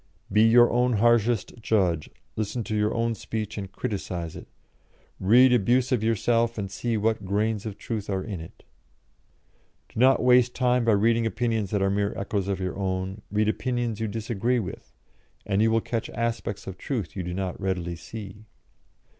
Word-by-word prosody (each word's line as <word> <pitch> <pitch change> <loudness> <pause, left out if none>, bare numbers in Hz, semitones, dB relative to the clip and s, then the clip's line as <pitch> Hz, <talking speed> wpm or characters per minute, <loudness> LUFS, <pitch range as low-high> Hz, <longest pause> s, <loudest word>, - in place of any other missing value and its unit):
"Be 105 - +4
your 120 +2 +6
own 125 +1 +2
harshest 115 0 +2
judge, 90 -8 +1 0.3
listen 110 +2 -2
to 110 - -3
your 105 0 +1
own 115 0 0
speech 110 0 -5
and 100 -2 -6
criticise 95 -8 -4
it; - - -10 0.7
read 125 +7 +6
abuse 125 +3 +2
of 120 -4 +1
yourself 115 +1 +1
and 100 -2 -4
see 115 +3 -2
what 110 0 0
grains 105 +2 -1
of 100 -2 -6
truth 105 -1 -5
are 95 -1 -1
in 100 -5 -5
it." 80 - -13 1.3
"Do - - -7
not 130 +1 +5
waste 125 -1 +4
time 125 -1 +2
by 115 - +4
reading 115 +3 +3
opinions 115 -3 -1
that 100 -1 0
are 95 - +2
mere 100 0 -1
echoes 100 -1 -2
of 100 -1 -1
your 95 +1 -3
own; 95 +1 -2
read 105 +1 +1
opinions 120 -1 -1
you 110 - -1
disagree 115 +3 -1
with, 100 -5 -6 0.5
and 100 0 +1
you 110 - +4
will 115 0 +2
catch 115 0 -3
aspects 115 -4 -3
of 95 -1 -8
truth 115 - -4
you 95 - -3
do 90 0 -4
not 95 0 -4
readily 90 -3 -2
see." 105 +3 -9
110 Hz, 180 wpm, -26 LUFS, 100-115 Hz, 1.3 s, your